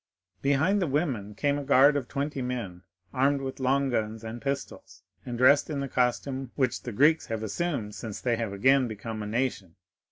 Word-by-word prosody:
"Behind 150 +9 +2
the 180 - +1
women 130 -9 -1
came 145 +5 0
a - - -5
guard 140 +1 +5
of 135 -4 -2
twenty 140 -1 -3
men 120 -8 -4 0.3
armed 140 +2 +2
with 135 0 -5
long 135 +1 +1
guns 110 -1 -2
and 115 +1 -6
pistols, 140 0 -5 0.2
and 120 -1 -4
dressed 140 +5 +5
in 145 -2 -2
the 140 - -2
costume 130 +1 -1
which 130 -3 0
the 120 - -6
Greeks 150 +8 +3
have 110 -2 -3
assumed 110 - -2
since 105 0 -6
they 120 -2 0
have 115 -3 -3
again 130 +6 +3
become 110 0 -6
a 105 - -4
nation. 110 -6 -2
130 Hz, 190 wpm, -27 LUFS, 110-140 Hz, 0.3 s, guard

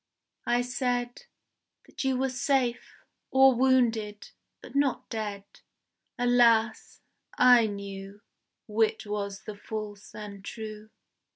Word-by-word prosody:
I 245 0 +2
said 245 - -2 0.6
That - - -7
you 265 -1 +1
were 265 0 0
safe 260 -2 -1 0.3
or 265 0 +6
wounded 235 -5 +1 0.3
but - - -13
not 280 -2 +1
dead. 210 -3 -4 0.7
Alas! 235 -3 +3 0.4
I 245 -3 +6
knew 200 0 -7 0.5
Which 220 0 +1
was 200 -1 -4
the 215 - -7
false 210 -1 -7
and 205 -2 -8
true. 215 0 -8
225 Hz, 105 wpm, -28 LUFS, 210-250 Hz, 0.7 s, or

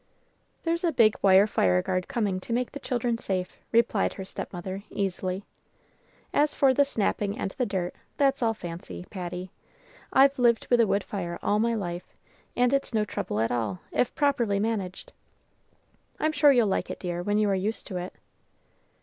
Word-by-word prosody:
"There's 335 +1 0
a 340 - +3
big 225 -6 +4
wire 195 0 +6
fireguard 180 - +1
coming 210 -8 -1
to 230 - -5
make 245 +1 0
the 285 - -7
children 245 -3 -1
safe," 185 -4 -3
replied 230 -3 +2
her 190 - -6
stepmother, 185 +1 -5
easily. 190 -1 -2 0.9
"As 295 0 +2
for 270 -2 +4
the 285 +2 +4
snapping 205 -5 -1
and 195 - -3
the 250 +2 -2
dirt, 185 -3 -2 0.2
that's 275 -2 +2
all 225 -2 +2
fancy, 165 - -7
Patty. 180 0 -5 0.6
I've 275 0 +5
lived 235 -2 +3
with 245 - +5
a 230 - +5
wood 200 0 +1
fire 175 -4 -4
all 210 - +2
my 230 +1 +2
life, 175 -4 -5 0.4
and 250 +1 +3
it's 275 -4 0
no 215 -1 +2
trouble 110 - -3
at 115 - +1
all, 110 -6 -2
if 250 - 0
properly 245 -9 +2
managed. 200 -4 -3 1.1
I'm 310 - +2
sure 295 -1 +5
you'll 245 -4 +4
like 195 - -1
it, - - -5
dear, 175 -1 -3
when 205 +3 0
you 215 -1 +3
are - - +2
used 200 +4 -2
to 185 - -5
it." 180 +1 -6
205 Hz, 175 wpm, -27 LUFS, 185-245 Hz, 1.1 s, wire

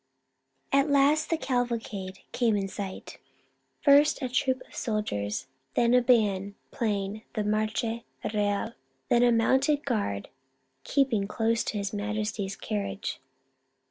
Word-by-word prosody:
At 275 +2 +3
last 285 +2 +4
the 330 - +1
cavalcade 230 -8 -2
came 235 -3 +2
in 195 -1 -1
sight, 195 -1 -7 0.3
— - - -46
first 290 +1 +6
a 255 - -1
troop 260 +1 0
of - - -20
soldiers, 130 - -2 0.3
then 235 0 +3
a 250 - +6
band 205 -5 +2 0.2
playing 205 -2 -2
the 215 - 0
Marcha 215 +2 -1 0.3
Real, 205 +2 0 0.4
then 240 - +4
a 245 0 +5
mounted 270 +6 +3
guard 205 - -1 0.5
keep 275 -3 +2
ing 200 -2 +1
close 225 +2 +1
to 215 - -2
His 200 0 -3
Majesty's 210 -1 -2
carnage. 205 -5 -4
220 Hz, 135 wpm, -28 LUFS, 205-250 Hz, 0.5 s, first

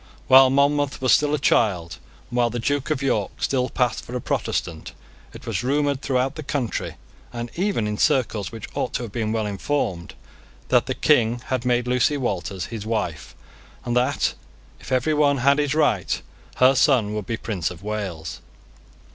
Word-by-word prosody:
While 130 0 +8
Monmouth 140 +1 +2
was 130 -2 +2
still 150 0 +4
a - - -1
child, 90 - +1 0.3
and 120 - -3
while 120 -1 +3
the 120 - -4
Duke 145 +5 -1
of 145 -3 -1
York 105 -7 0
still 130 -2 0
passed 125 -2 0
for 125 - -8
a - - -1
Protestant, - - -3 0.4
it - - -12
was - - -2
rumoured 140 +1 0
throughout 130 0 0
the 155 - -7
country, 140 -6 -3 0.4
and 120 0 -6
even 190 - 0
in 105 0 -3
circles 110 -6 +1
which 115 -3 -8
ought - - -2
to 125 - -2
have 115 - -7
been 110 -1 -2
well 110 -1 -1
informed, 100 -3 -2 0.5
that - - +3
the - - -2
King 120 +1 +2
had 130 -1 -1
made 125 -1 +2
Lucy 125 +4 +2
Walters 95 - -3
his 110 -3 -4
wife, 105 -9 -3 0.5
and 120 0 -1
that, 125 +1 +1 0.5
if - - -11
every 130 +4 +2
one 145 -2 +3
had 140 +3 +3
his 145 0 0
right, 155 - +1 0.4
her 130 +1 +5
son 125 -6 +3
would 105 -3 -4
be 115 - -2
Prince 95 -9 -2
of 90 +1 -11
Wales. 95 -6 -4
125 Hz, 180 wpm, -23 LUFS, 105-140 Hz, 0.5 s, While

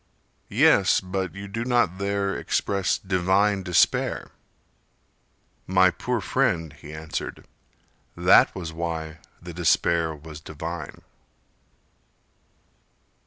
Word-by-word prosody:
"Yes, - - +4
but 95 -1 -4
you 100 +1 -7
do 115 +4 -4
not 120 -7 +1
there 100 0 -1
express 100 -1 0
divine 95 +2 +1
despair." 90 -2 +1 1.4
"My 95 0 +4
poor - - -2
friend," 80 -3 0
he 75 - -12
answered, 80 0 -6 0.7
"that - - +5
was 85 -3 -6
why 80 -1 -4 0.2
the 85 0 -9
despair 85 -1 +1
Was 75 +1 -11
divine." 80 0 -7
90 Hz, 95 wpm, -25 LUFS, 80-95 Hz, 1.4 s, that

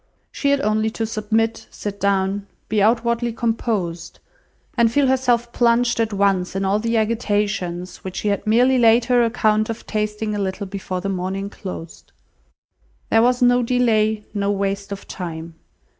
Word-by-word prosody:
She 280 - -1
had 280 0 +2
only 215 +1 +1
to 225 +1 -3
submit, 225 +1 -1
sit 200 -1 -6
down, 200 0 0 0.2
be 215 -1 +1
outwardly 235 +2 +2
composed, 220 -7 -2 0.6
and 235 -2 +3
feel 285 +3 +3
herself 245 -2 +1
plunged 235 0 +2
at 225 -1 +1
once 195 -2 +1
in 195 0 -1
all 200 +2 +2
the 230 +1 0
agitations 205 -5 -1
which 185 -1 -8
she 210 - -1
had 200 +1 -2
merely 250 +4 +4
laid 230 0 +5
her 245 -1 +3
account 215 -2 +1
of 225 0 -5
tasting 210 0 -2
a 205 - -2
little 195 +1 -3
before 190 -1 -5
the 195 - -3
morning 195 +1 -3
closed. 180 -5 -9 1.0
There 225 - +5
was 250 +1 +3
no 245 0 +5
delay, 220 -3 +2
no 200 -1 -1
waste 200 0 -2
of 200 0 -7
time. 165 -2 -6
215 Hz, 160 wpm, -21 LUFS, 195-235 Hz, 1.0 s, laid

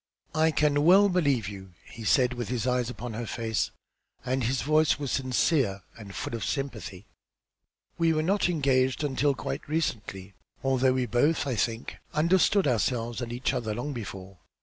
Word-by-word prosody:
"I 160 +1 +3
can 150 -2 +2
well 195 +5 +6
believe 145 - +1
you," 95 -3 -9
he 115 - -10
said, 125 +4 +3
with 120 -3 -5
his 125 -2 -2
eyes 125 -1 +1
upon 125 -1 -6
her 115 +1 -4
face, 110 -3 -1 0.6
and 130 0 0
his 125 +2 0
voice 155 +1 +3
was 140 -3 -4
sincere 130 - +1
and 100 -4 -10
full - - -4
of 115 - -3
sympathy. 110 -8 -4 0.9
"We 165 -1 +3
were 155 -1 +1
not 190 +2 +2
engaged 135 -4 +1
until 145 0 +1
quite - - -5
recently. 105 - -3 0.3
Although 130 -1 +3
we 130 -1 0
both, 145 +8 +1
I 135 - -1
think, 115 +1 -2 0.2
understood 185 +5 +3
ourselves 120 0 0
and 120 -1 -4
each 125 +2 -1
other 110 -3 -2
long 140 +5 -4
before. 95 -6 -8
130 Hz, 170 wpm, -27 LUFS, 115-150 Hz, 0.9 s, well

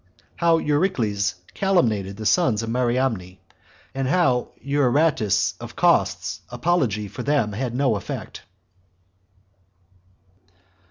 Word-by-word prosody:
How 170 -1 +3
Eurycles 125 - 0 0.2
40 - - -24
Calumniated 110 - +1
The 110 - -6
Sons 115 - +2
Of 115 - -3
Mariamne; 120 -7 -1 0.6
And 135 -1 -2
How 135 -5 +2
Euaratus 140 - +1
Of - - -9
Cos's - - +1
Apology 125 - 0
For - - -7
Them 140 -7 +1
Had 120 +3 -3
No 130 -4 +2
Effect. 100 - -6
125 Hz, 105 wpm, -23 LUFS, 105-145 Hz, 0.6 s, How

